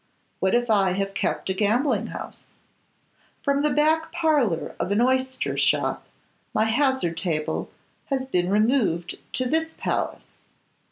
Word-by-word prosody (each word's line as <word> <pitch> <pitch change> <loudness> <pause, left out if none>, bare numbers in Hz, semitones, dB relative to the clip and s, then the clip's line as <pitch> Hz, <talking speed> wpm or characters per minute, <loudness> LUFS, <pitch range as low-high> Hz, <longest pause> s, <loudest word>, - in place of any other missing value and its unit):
What 190 +3 +2
if 240 0 +1
I 195 -3 +3
have 195 +1 -2
kept 190 - -1
a - - +1
gambling 220 +3 +1
house? - - -8 1.0
From 280 0 +2
the 300 - +2
back 315 +2 +2
parlour 275 - +1
of 175 +3 -2
an 205 - +2
oyster 260 +1 +1
shop - - +1 0.5
my 215 - +3
hazard 250 - +1
table 160 -3 -2 0.4
has 265 -2 -2
been 180 -8 0
removed 210 -5 +1
to 255 - 0
this 320 +4 -1
palace. - - -3
240 Hz, 135 wpm, -24 LUFS, 190-280 Hz, 1.0 s, I